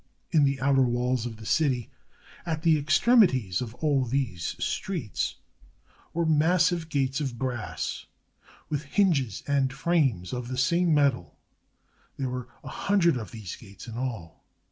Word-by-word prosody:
In 155 -4 +5
the 135 -1 0
outer 135 0 +3
walls 125 -1 +1
of 110 -2 -8
the 110 - -11
city, 130 -4 +1 0.5
at 160 -2 -3
the 165 -2 +5
extremities 145 - +3
of 120 -2 -5
aU 140 -4 +2
these 115 - -2
streets, 165 - -2 0.8
were 170 0 0
massive 165 +2 +2
gates 135 -1 0
of 130 -5 -3
brass, 125 -3 -4 0.6
with 150 -2 -2
hinges 140 - +1
and 140 -2 +1
frames 135 - 0
of 125 -1 -4
the 130 +1 -4
same 170 +6 +2
metal. 140 - +1 0.8
There 135 -2 -2
were 125 -1 -5 0.2
a - - -10
hundred 190 -6 +2
of 115 -4 -5
these 110 -7 -7
gates 100 0 -13
in 115 - -7
all. 115 -10 -5
135 Hz, 145 wpm, -27 LUFS, 120-160 Hz, 0.8 s, In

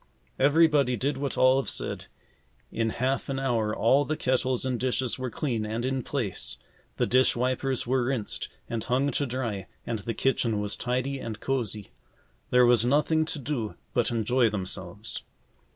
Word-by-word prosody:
Everybody 145 -2 +4
did 140 +6 -1
what 140 0 -3
Olive 130 +1 +4
said. - - -3 0.6
In 115 -1 0
half 130 +5 -1
an 135 - -1
hour 120 -5 0
all 135 +6 +4
the 155 +1 -2
kettles 130 -2 +1
and 125 -2 -1
dishes 130 0 -1
were 130 -1 -2
clean 120 -3 -2
and 110 +3 -2
in 135 0 0
place. 120 -7 -3 0.4
The - - +2
dish 130 +1 +4
wipers 130 +1 0
were 125 0 +1
rinsed 120 -5 -2 0.2
and 115 -2 -3
hung 135 +3 +1
to 145 - 0
dry 115 -7 -3 0.2
and 115 -2 -2
the 115 +2 -4
kitchen 115 -4 +1
was 105 0 -2
tidy 130 +2 -1
and 110 -4 -5
cosy. 110 - -2 0.6
There 125 0 +6
was 120 -2 +5
nothing 150 +5 +3
to 160 - -3
do 130 -6 -3 0.2
but 120 - +2
enjoy 120 +1 +2
themselves. 95 0 -4
125 Hz, 165 wpm, -27 LUFS, 115-135 Hz, 0.6 s, There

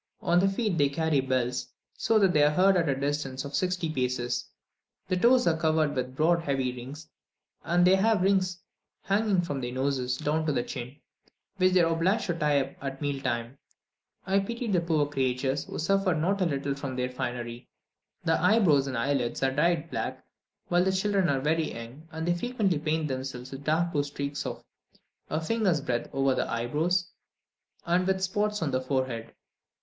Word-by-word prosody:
On 175 +1 +3
the 195 +2 +3
feet 195 -3 -1
they 140 -1 +4
carry 155 0 +1
bells, 130 -1 -1 0.3
so 225 - +2
that 195 -4 +4
they 150 - +4
are 145 - +6
heard 185 +5 +4
at 165 -4 +2
a 135 - +2
distance 140 -1 -2
of 140 - -7
sixty 180 -1 0
paces; 125 -4 -2 0.6
the 185 - +2
toes 245 +7 +4
are 165 - +3
covered 155 -2 +1
with 130 -1 -3
broad 170 +4 +3
heavy 135 -5 -1
rings, 140 +6 -9 0.6
and 175 +1 +3
they 185 - +6
have 210 -1 +2
rings 185 -2 +1 0.4
hanging 200 -2 +2
from 145 -5 -3
their 120 0 -3
noses 130 -1 -1
down 155 +3 0
to - - +2
the 120 - 0
chin, 125 +2 -7 0.6
which 185 0 +3
they 185 - +5
are 165 0 +3
obliged 185 +6 +1
to 175 - 0
tie 150 -3 +2
up 135 - -5
at 135 -1 -4
meal 145 -2 -2
time. 120 +2 -3 0.7
I 195 +1 +2
pitied 230 +2 -3
the 175 - +3
poor 160 -3 +1
creatures, 135 -1 -1
who - - -7
suffered 190 +1 +1
not 190 +6 0
a 180 - +3
little 140 -2 -1
from 135 -1 -5
their 125 0 -1
finery! 120 -1 -5 0.5
The 165 0 +1
eyebrows 180 -8 +4
and 130 -3 -3
eyelids 125 0 -1
are 135 - +3
dyed 165 +3 +1
black - - -4 0.4
while 175 0 +3
the 190 - +2
children 190 -1 +1
are 135 -2 +1
very 160 +2 0
young, 120 +7 -10
and 160 +1 -4
they 175 - +3
frequently 200 -4 0
paint 155 0 -1
themselves 130 -1 -5
with 135 +1 -8
dark 165 +3 +1
blue 145 -2 +1
streaks 140 0 -4
of - - -6 0.7
a 155 - 0
finger's 185 -1 +1
breadth 125 -4 -2
over 135 -1 +2
the - - -1
eyebrows, 155 +10 0 0.7
and 180 +1 +2
with 190 0 +1
spots 210 +1 0
on 145 - -1
the 130 - 0
forehead. 130 -4 -2
155 Hz, 190 wpm, -28 LUFS, 135-180 Hz, 0.7 s, are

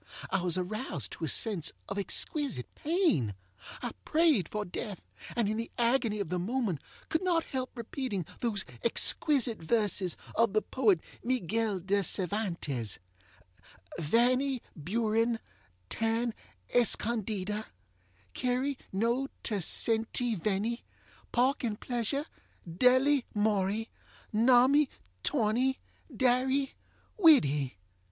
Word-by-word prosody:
I 195 - +1
was 175 -1 0
aroused 185 - -3
to 165 - -4
a - - -2
sense 185 -5 +2 0.2
of 195 +1 -3
exquisite 265 - 0
pain. 295 - +1 0.5
I 240 - -2
prayed 310 - +3
for 210 0 -3
death, 200 +1 -6 0.3
and, 235 -3 +1
in 215 +1 -1
the 230 - -3
agony 235 -3 +2
of 200 - -3
the 180 0 -1
moment, 200 - -1 0.3
could 320 - 0
not 350 -3 +1
help 260 -1 -4
repeating 230 - -3
those 225 -5 -1 0.2
exquisite 245 - +4
verses 200 -1 +1 0.2
of 230 -3 +2
the 215 - +3
poet 210 -10 +2 0.2
Miguel 225 -3 0
De 195 +3 +1
Cervantes: 170 - -1 1.0
Vanny 250 - +2
Buren, 225 +7 0 0.5
tan 225 - 0 0.4
escondida 215 -3 +1 0.7
Query 255 +2 -1
no 235 +7 0 0.2
te 210 - +1
senty 225 +5 +2
venny 210 +5 -1 0.5
Pork 260 +4 +2
and 215 -3 -2
pleasure, 250 +4 -1 0.4
delly 255 - +4
morry 210 +1 +1 0.5
Nommy, 255 +6 +5 0.4
torny, 255 +1 +1 0.3
darry, 260 +3 +1 0.5
widdy! 145 - +5
225 Hz, 110 wpm, -30 LUFS, 195-255 Hz, 1.0 s, Nommy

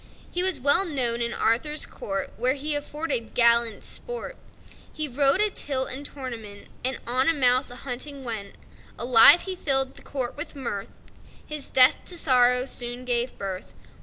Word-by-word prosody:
He 355 - -1
was 370 -6 +2
well 285 +8 +4
known 250 -9 +1
in 235 0 -1
Arthur's 280 +9 +1
court, 195 -1 -6
Where 250 +5 0
he 295 +2 -4
afforded 290 -4 -4
gallant 235 -2 +2
sport; 485 +1 -1 0.6
He 310 0 -4
rode 275 +5 +2
a 425 - +3
tilt 265 -6 +2
and 265 +3 -5
tournament, 235 -8 -7
And 260 +1 -2
on 255 +5 +1
a 330 - +1
mouse 255 -1 +2
a 245 - -10
hunting 270 +2 -3
went. 220 -5 -6 0.4
Alive 235 +6 +7
he 380 -1 -5
filled 270 -5 +2
the - - -14
court 260 -3 -5
with 290 - -6
mirth; 235 -7 -5 0.6
His 300 -2 -5
death 255 0 +5
to 355 - -2
sorrow 250 -4 +3
soon 245 -1 -5
gave 245 0 -2
birth. 190 -1 -7
260 Hz, 165 wpm, -24 LUFS, 235-290 Hz, 0.6 s, Alive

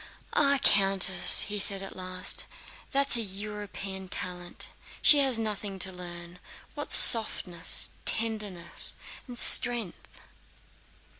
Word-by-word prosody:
"Ah, 280 0 +1
Countess," 195 -2 +4
he 210 0 -4
said 195 0 +5
at 195 - -11
last, 185 0 -6 0.5
"that's 275 -2 0
a - - -2
European 200 -1 -8
talent, 180 -1 -6 0.3
she 295 - +4
has 265 -4 +1
nothing 210 -3 -6
to 190 0 0
learn—what 175 -1 -12
softness, 185 -7 +5
tenderness, 210 -6 -4 0.3
and 245 -1 -9
strength...." 240 -6 0
195 Hz, 100 wpm, -26 LUFS, 185-225 Hz, 0.5 s, said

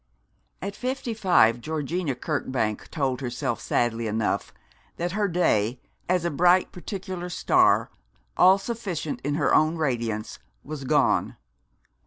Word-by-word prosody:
At 200 +1 -4
fifty 255 -2 -3
five, 175 - +3
Georgina 155 +1 -2
Kirkbank 125 -6 -2
told 135 -4 -1
herself 125 -1 -3
sadly 115 -1 0
enough 110 0 -1 0.5
that 175 +1 -2
her 205 +2 0
day, 125 - +1 0.3
as 180 -2 +1
a 170 - 0
bright 175 +5 +3
particular 185 -1 -6
star, 175 - +3 0.4
all 190 +1 +6
sufficient 195 -8 -4
in 145 +1 -1
her 145 -3 +1
own 155 +2 +4
radiance, 120 -8 -2 0.2
was 145 -2 -7
gone. - - +2
155 Hz, 125 wpm, -25 LUFS, 125-180 Hz, 0.5 s, all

